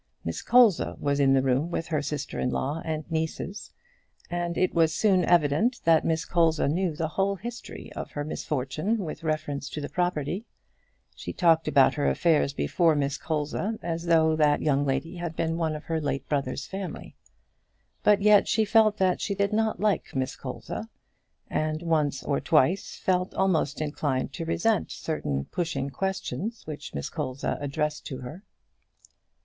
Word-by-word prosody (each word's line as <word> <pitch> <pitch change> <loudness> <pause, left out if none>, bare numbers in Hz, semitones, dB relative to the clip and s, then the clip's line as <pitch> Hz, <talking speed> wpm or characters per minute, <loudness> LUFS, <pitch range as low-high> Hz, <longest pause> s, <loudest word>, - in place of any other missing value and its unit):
Miss 85 - -3
Colza 240 -6 +4
was 140 0 0
in 135 -1 +5
the 135 -1 +3
room 135 +5 +1
with 165 -1 -3
her 155 -3 0
sister 145 -1 -4
in 125 - 0
law 145 +6 -2
and 155 -1 -3
nieces, 160 +5 -3 0.6
and 175 -1 -2
as - - +3
it 185 - +1
was 160 -2 +3
soon 190 -3 +3
evident 170 - +3
that 165 -1 +5
Miss 160 0 0
Colza 165 -4 +2
knew 170 +2 0
the 160 0 -2
whole 195 +5 0
history 235 +5 -8
of - - -6
her 145 - -2
misfortune 155 - -2
with 155 0 -6
reference 145 -3 -2
to - - -5
the 145 - -5
property, 180 +3 -1 0.7
she - - -6
talked 165 -2 +3
about 135 -2 +5
her 145 - +1
affairs 160 -4 +2
before 165 +3 +2
Miss 140 -1 0
Colza 160 +8 -2
as 170 0 -3
though 160 -1 +4
that 150 -1 +3
young 145 -2 +2
lady 140 +7 -2
had 170 -2 -4
been 165 0 -1
one 160 -2 -1
of 150 - -7
her 160 -1 -2
late 140 -2 -2
brother's 140 -1 -2
family. 190 -1 -7 0.9
But 205 -1 +4
yet 210 -1 +6
she 220 -1 +2
felt 215 -1 +4
that 185 -2 +2
she 200 - -1
did 200 +1 0
not 220 0 +1
like 205 -8 0
Miss 130 -1 -1
Colza, - - -6 0.6
and 155 +1 -1
once 150 -5 +1
or 140 - 0
twice 165 +5 +2
felt 180 0 0
almost 170 -6 +1
inclined 145 -3 -2
to 165 - -4
resent 200 +5 +1
certain 70 - -3
pushing 140 -6 -2
questions 195 - -3
which 150 -1 -7
Miss 70 - -3
Colza 135 -3 -3
addressed 150 +2 -2
to 130 - -5
her. 150 +9 -8
160 Hz, 170 wpm, -27 LUFS, 145-180 Hz, 0.9 s, yet